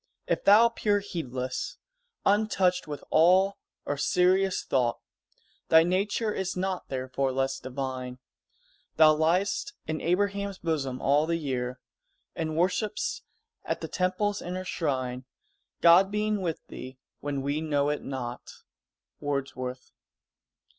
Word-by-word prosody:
if - - -1
thou 210 +3 +8
appear 215 -3 +1
Heedless 130 -10 -4 0.5
untouched 195 -4 +2
with 145 -1 -6
awe 185 +4 +5 0.3
or 145 - -2
serious 185 +5 +2
thought, 120 -3 +1 0.7
Thy 160 0 +7
nature 200 +5 0
is 190 -1 -3
not 185 0 -2
therefore 130 +1 -1
less 135 0 -1
divine: 130 -1 -5 0.8
Thou 155 -1 +7
liest 175 +6 +1
in 155 0 -3
Abraham's 200 +2 0
bosom 140 -7 -2
all 145 +3 +3
the 170 0 +1
year; 125 -4 -3 0.6
And 155 -1 -3
worship'st 195 +5 0 0.4
at - - -3
the - - -4
Temple's 195 +3 0
inner 185 +1 -5
shrine, 130 -7 -2 0.6
God 175 +3 +7
being 210 0 0
with 165 -4 -3
thee 130 0 -9 0.2
when 140 -2 -3
we 145 +2 -1
know 145 -2 +1
it 150 - -1
not." 125 -3 -7 0.6
_Wordsworth. 130 -3 -4
160 Hz, 120 wpm, -28 LUFS, 135-190 Hz, 0.8 s, thou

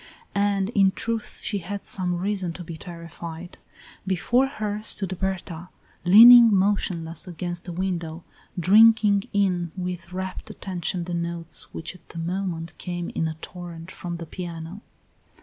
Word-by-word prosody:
And 200 -1 +1
in 195 -4 +3
truth 230 -1 -3
she 205 - -1
had 195 +3 -6
some 180 -2 -1
reason 190 -2 -2
to 175 - -8
be 165 -1 -7
terrified. 170 0 -9 0.5
Before 240 +8 +2
her 215 -5 -3
stood 195 -3 -2
Berta, 180 -2 -3 0.4
leaning 230 +5 +10
motionless 185 -4 0
against 175 0 -5
the 180 - -5
window, 170 -2 -3 0.4
drinking 210 +2 +6
in 180 -4 +1
with 180 -1 -5
rapt 185 0 -5
attention 180 -1 -3
the 175 +1 -5
notes 170 -1 -3
which 160 - -6
at 185 - -19
that - - -10
moment 170 -1 -3
came 175 -1 -4
in 160 - -1
a 160 -1 -5
torrent 175 -1 -8
from 175 -1 -6
the 165 - -7
piano. 170 +2 -7
180 Hz, 145 wpm, -25 LUFS, 170-200 Hz, 0.5 s, leaning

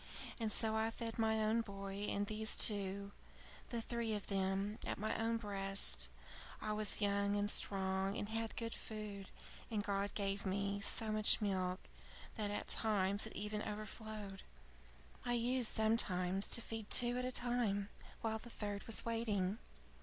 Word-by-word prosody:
And 220 -2 -1
so 220 +1 +3
I 220 0 +1
fed 225 0 -6
my 220 0 +2
own 220 +2 +2
boy 200 -1 -5
and 200 0 0
these 215 +1 +4
two 200 -1 +2 0.6
the 235 -2 -3
three 230 -2 -2
of 205 - -5
them 195 +2 -1
at - - -2
my 215 +2 -1
own 230 +1 0
breast. 195 -2 -1 0.5
I 215 0 -2
was 210 0 -1
young 200 0 +2
and 205 0 +2
strong, 190 0 +4
and 205 - -3
had 225 +1 -3
good 230 -1 -3
food, 210 -3 -6 0.4
and 210 -2 -1
God 200 0 -2
gave 200 -1 -1
me 200 +1 -1
so 220 +2 +7
much 215 0 +4
milk 185 -3 -1 0.5
that 210 -2 -3
at 205 - -3
times 205 -1 +3
it - - -10
even 210 +1 -3
overflowed. 215 -1 -6 0.8
I 245 - 0
used 240 0 +2
sometimes 195 -4 +2
to 235 - +3
feed 225 -2 -6
two 245 0 +3
at - - -2
a 255 - -2
time, 240 -5 0 0.3
while 220 -1 -1
the 240 - -11
third 205 -3 -5
was 225 - -1
waiting. 220 -3 -1
210 Hz, 160 wpm, -38 LUFS, 200-225 Hz, 0.8 s, so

